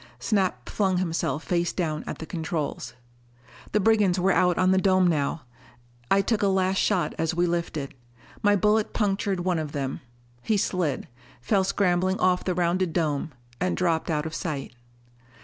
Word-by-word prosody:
Snap 185 Hz, -, -1 dB
flung 190 Hz, -3 st, 0 dB
himself 165 Hz, -4 st, -1 dB
face 175 Hz, -1 st, 0 dB
down 155 Hz, -4 st, -2 dB
at -, -, -4 dB
the 160 Hz, -, -7 dB
controls. 160 Hz, -6 st, -4 dB, 0.8 s
The 210 Hz, -, +2 dB
brigands 205 Hz, -3 st, +3 dB
were 190 Hz, +2 st, +3 dB
out 180 Hz, -1 st, +3 dB
on 185 Hz, 0 st, +3 dB
the 190 Hz, -, +4 dB
dome 185 Hz, -1 st, +4 dB
now. 155 Hz, -3 st, 0 dB, 0.7 s
I 195 Hz, -, +4 dB
took 220 Hz, +1 st, 0 dB
a 200 Hz, -, +3 dB
last 190 Hz, 0 st, +1 dB
shot 190 Hz, -4 st, +1 dB
as 165 Hz, +1 st, 0 dB
we 175 Hz, +1 st, +2 dB
lifted. 170 Hz, -5 st, -2 dB, 0.5 s
My 205 Hz, 0 st, +4 dB
bullet 210 Hz, +2 st, +2 dB
punctured 195 Hz, -3 st, 0 dB
one 180 Hz, -2 st, 0 dB
of 150 Hz, -2 st, -5 dB
them: 135 Hz, -2 st, -3 dB, 0.4 s
he 215 Hz, -, +1 dB
slid, 180 Hz, -7 st, -1 dB, 0.3 s
fell 190 Hz, -, +1 dB
scrambling 185 Hz, -1 st, +1 dB
off 180 Hz, 0 st, +2 dB
the 185 Hz, -, -1 dB
rounded 175 Hz, 0 st, 0 dB
dome 155 Hz, -3 st, -1 dB, 0.3 s
and 180 Hz, +1 st, 0 dB
dropped 170 Hz, -3 st, 0 dB
out 150 Hz, -1 st, 0 dB
of 160 Hz, -, -5 dB
sight. 150 Hz, -8 st, -4 dB
180 Hz, 165 wpm, -26 LUFS, 160-190 Hz, 0.8 s, the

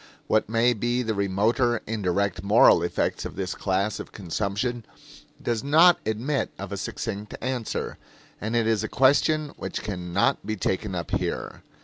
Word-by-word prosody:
What 110 Hz, -1 st, +1 dB
may 115 Hz, +2 st, +3 dB
be 120 Hz, +3 st, 0 dB
the 110 Hz, -1 st, -1 dB
remoter, 110 Hz, +5 st, +1 dB
indirect, 100 Hz, -3 st, -1 dB
moral 100 Hz, -3 st, +6 dB
effects 85 Hz, -, -1 dB
of -, -, -6 dB
this 95 Hz, -1 st, -3 dB
class 100 Hz, +2 st, -1 dB
of -, -, -8 dB
consumption 105 Hz, +6 st, -2 dB, 0.6 s
does 115 Hz, -2 st, -2 dB
not 165 Hz, +5 st, +6 dB
admit 125 Hz, +7 st, -1 dB
of 100 Hz, 0 st, -7 dB
a 100 Hz, -, -3 dB
succinct 105 Hz, 0 st, -5 dB
answer, 125 Hz, -3 st, -3 dB, 0.4 s
and 110 Hz, +3 st, -2 dB
it 115 Hz, -1 st, +2 dB
is 110 Hz, -2 st, +1 dB
a -, -, -1 dB
question 145 Hz, +3 st, +3 dB
which -, -, -5 dB
can 90 Hz, -4 st, -5 dB
not 100 Hz, +3 st, +2 dB
be 110 Hz, +1 st, -2 dB
taken 95 Hz, 0 st, -2 dB
up 85 Hz, -2 st, -4 dB
here. -, -, -3 dB
110 Hz, 160 wpm, -25 LUFS, 100-120 Hz, 0.6 s, moral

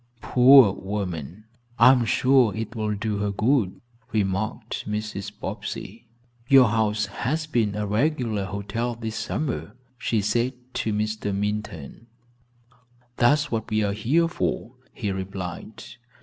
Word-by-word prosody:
"Poor 125 Hz, -4 st, +7 dB
woman, 95 Hz, -2 st, -5 dB, 0.3 s
I -, -, +8 dB
am 125 Hz, -3 st, +2 dB
sure 125 Hz, -1 st, +3 dB
it 110 Hz, +1 st, -5 dB
will 105 Hz, -1 st, -1 dB
do 105 Hz, 0 st, -2 dB
her 105 Hz, 0 st, 0 dB
good," 105 Hz, -1 st, +1 dB, 0.3 s
remarked 105 Hz, +2 st, -2 dB
Mrs. 105 Hz, -2 st, -4 dB
Bobbsey. -, -, -6 dB, 0.4 s
"Your 130 Hz, -3 st, +7 dB
house 105 Hz, -1 st, +1 dB
has 140 Hz, +10 st, -2 dB
been 115 Hz, -9 st, 0 dB
a 105 Hz, 0 st, -2 dB
regular 110 Hz, -2 st, 0 dB
hotel 100 Hz, +5 st, -3 dB
this 110 Hz, -1 st, -5 dB
summer," 135 Hz, -1 st, -3 dB, 0.2 s
she 115 Hz, -, 0 dB
said 115 Hz, +5 st, 0 dB, 0.2 s
to 110 Hz, -, -1 dB
Mr. 105 Hz, -1 st, -2 dB
Minturn. 105 Hz, -2 st, -4 dB, 1.1 s
"That's 145 Hz, +4 st, +3 dB
what 110 Hz, -2 st, -2 dB
we 110 Hz, 0 st, +1 dB
are 100 Hz, -1 st, 0 dB
here 135 Hz, +11 st, +2 dB
for," 165 Hz, -7 st, -2 dB, 0.2 s
he 105 Hz, -4 st, -3 dB
replied. 95 Hz, +2 st, -6 dB
110 Hz, 130 wpm, -24 LUFS, 100-120 Hz, 1.1 s, I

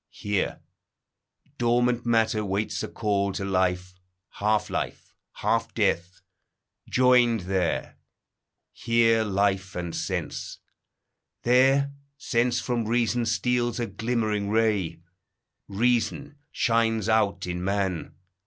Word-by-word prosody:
Here, 105 Hz, -2 st, -2 dB, 1.0 s
dormant 120 Hz, 0 st, +1 dB
matter 110 Hz, -2 st, +2 dB
waits 100 Hz, +2 st, -2 dB
a -, -, -3 dB
call 100 Hz, -3 st, -1 dB
to 95 Hz, -, -3 dB
life; 90 Hz, -1 st, 0 dB, 0.4 s
Half 105 Hz, 0 st, 0 dB
life, -, -, -4 dB, 0.2 s
half -, -, -1 dB
death, 90 Hz, +2 st, 0 dB, 0.7 s
joined 125 Hz, -3 st, +4 dB
there; 90 Hz, -1 st, -2 dB, 0.7 s
here 115 Hz, -1 st, +3 dB
life 100 Hz, -1 st, 0 dB
and 85 Hz, -2 st, -4 dB
sense; -, -, -4 dB, 0.9 s
There, 135 Hz, +3 st, +4 dB, 0.2 s
sense 120 Hz, -2 st, 0 dB
from 120 Hz, -3 st, -2 dB
reason 120 Hz, 0 st, +1 dB
steals 120 Hz, +2 st, 0 dB
a 120 Hz, -, 0 dB
glimmering 110 Hz, -1 st, -1 dB
ray; 105 Hz, -7 st, 0 dB, 0.7 s
Reason 120 Hz, +7 st, 0 dB, 0.2 s
shines 115 Hz, -2 st, +1 dB
out 110 Hz, -3 st, +1 dB
in 90 Hz, 0 st, -4 dB
man. 95 Hz, -4 st, -2 dB
110 Hz, 100 wpm, -26 LUFS, 100-120 Hz, 1.0 s, joined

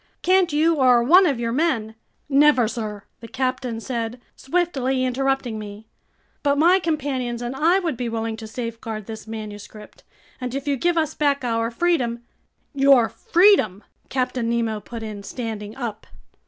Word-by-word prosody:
Can't 370 Hz, -2 st, +3 dB
you 315 Hz, +2 st, +2 dB
or 250 Hz, -3 st, +5 dB
one 360 Hz, +9 st, +6 dB
of 275 Hz, -6 st, 0 dB
your 230 Hz, -1 st, -1 dB
men—" 240 Hz, -6 st, 0 dB, 0.3 s
"Never, 280 Hz, -4 st, +4 dB
sir," 215 Hz, -4 st, -5 dB, 0.2 s
the 230 Hz, -, -10 dB
captain 255 Hz, -2 st, -2 dB
said, 235 Hz, 0 st, -4 dB, 0.2 s
swiftly 270 Hz, -5 st, 0 dB
interrupting 260 Hz, -3 st, -1 dB
me. 210 Hz, +1 st, -9 dB, 0.6 s
"But 285 Hz, -1 st, +1 dB
my 350 Hz, +5 st, +5 dB
companions 275 Hz, -8 st, -2 dB
and 240 Hz, +2 st, -4 dB
I 330 Hz, +6 st, +3 dB
would 335 Hz, -9 st, -2 dB
be 245 Hz, -2 st, -3 dB
willing 225 Hz, 0 st, -3 dB
to 220 Hz, -1 st, -8 dB
safeguard 225 Hz, -2 st, -6 dB
this 220 Hz, 0 st, -8 dB
manuscript, 215 Hz, -1 st, -9 dB, 0.4 s
and 250 Hz, 0 st, -4 dB
if 275 Hz, +1 st, -4 dB
you 285 Hz, -, +2 dB
give 345 Hz, +6 st, 0 dB
us 315 Hz, -1 st, +1 dB
back 285 Hz, -2 st, +1 dB
our 230 Hz, -1 st, 0 dB
freedom—" 240 Hz, -4 st, 0 dB, 0.5 s
"Your 275 Hz, -4 st, +5 dB
freedom!" 350 Hz, -, +3 dB, 0.3 s
Captain 250 Hz, -2 st, -1 dB
Nemo 230 Hz, -2 st, 0 dB
put 230 Hz, +2 st, -8 dB
in, 210 Hz, -2 st, -6 dB
standing 215 Hz, -1 st, -6 dB
up. 230 Hz, -5 st, -6 dB
250 Hz, 155 wpm, -22 LUFS, 225-285 Hz, 0.6 s, one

